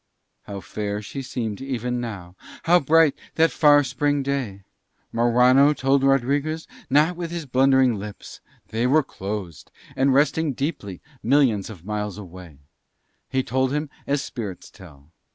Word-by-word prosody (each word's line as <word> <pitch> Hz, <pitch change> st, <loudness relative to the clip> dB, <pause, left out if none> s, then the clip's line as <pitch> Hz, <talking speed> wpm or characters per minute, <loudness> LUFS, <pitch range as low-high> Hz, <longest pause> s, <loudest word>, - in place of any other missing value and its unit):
How 100 Hz, -1 st, -6 dB
fair 105 Hz, +1 st, -4 dB
she 135 Hz, +7 st, -6 dB
seemed 125 Hz, -5 st, -4 dB
even 125 Hz, -2 st, -3 dB
now, 95 Hz, -7 st, -7 dB, 0.3 s
how 175 Hz, +2 st, +5 dB
bright 160 Hz, 0 st, +4 dB, 0.2 s
that 165 Hz, +1 st, +3 dB
far 145 Hz, -2 st, +5 dB
spring 145 Hz, +2 st, 0 dB
day. 130 Hz, -8 st, -3 dB, 0.5 s
Morano 125 Hz, +5 st, +4 dB
told 135 Hz, 0 st, +2 dB
Rodriguez 140 Hz, +4 st, +1 dB, 0.2 s
not 150 Hz, +6 st, +3 dB
with 170 Hz, -1 st, -5 dB
his 170 Hz, -2 st, -5 dB
blundering 130 Hz, -1 st, +3 dB
lips: 105 Hz, 0 st, -9 dB, 0.3 s
they 115 Hz, +3 st, 0 dB
were 155 Hz, +4 st, +4 dB
closed 95 Hz, -, -6 dB, 0.3 s
and 135 Hz, +1 st, +2 dB
resting 145 Hz, +2 st, +2 dB
deeply 120 Hz, -, -4 dB, 0.2 s
millions 120 Hz, -6 st, +2 dB
of 90 Hz, -6 st, -11 dB
miles 105 Hz, -2 st, -3 dB
away: 90 Hz, -6 st, -11 dB, 0.7 s
he 130 Hz, 0 st, 0 dB
told 130 Hz, +1 st, 0 dB
him 150 Hz, 0 st, -2 dB, 0.2 s
as 140 Hz, 0 st, 0 dB
spirits 105 Hz, -8 st, -7 dB
tell. 80 Hz, -6 st, -16 dB
130 Hz, 140 wpm, -23 LUFS, 105-145 Hz, 0.7 s, how